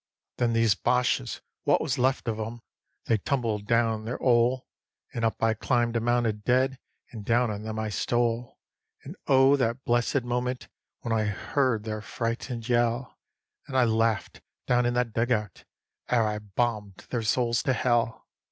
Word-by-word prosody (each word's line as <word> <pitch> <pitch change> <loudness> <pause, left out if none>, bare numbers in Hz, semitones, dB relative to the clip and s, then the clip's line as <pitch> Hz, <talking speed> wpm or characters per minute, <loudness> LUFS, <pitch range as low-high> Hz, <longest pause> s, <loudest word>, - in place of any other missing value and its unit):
Then 120 -1 +1
these 115 -2 +4
Boches, 125 - 0 0.2
wot - - +3
was 140 -3 -2
left 130 0 +1
of 110 -1 -1
'em, 115 +2 -5 0.4
they 115 - +2
tumbled 110 -4 -1
down 115 -1 +2
their 120 - -4
'ole, 125 +1 +3 0.5
And 115 - -3
up 115 0 0
I 115 0 +4
climbed 120 +1 0
a - - +3
mound 120 +1 +1
of 105 -2 -2
dead, 130 +2 +2 0.3
and 110 -3 -8
down 120 +2 +2
on 105 0 -5
them 110 0 -5
I 110 0 -2
stole. 120 +2 -1 0.5
And 150 +7 -9
oh 135 0 +6
that 125 0 -1
blessed 120 +2 +1
moment 125 +1 -2 0.3
when 115 - -2
I 110 -1 +1
heard 115 +2 0
their 110 -1 -4
frightened 115 +1 -4
yell, 120 +1 0 0.5
And 130 - -2
I 130 - +5
laughed 115 -1 0 0.2
down 125 0 +2
in 120 - -1
that 120 -2 0
dug 115 +3 0
out, 105 -5 -2 0.4
ere 115 -3 +3
I 105 0 -2
bombed 105 -1 -3
their 120 - 0
souls 120 +2 +1
to 135 -4 +1
hell. 115 -2 0
120 Hz, 170 wpm, -27 LUFS, 110-125 Hz, 0.5 s, oh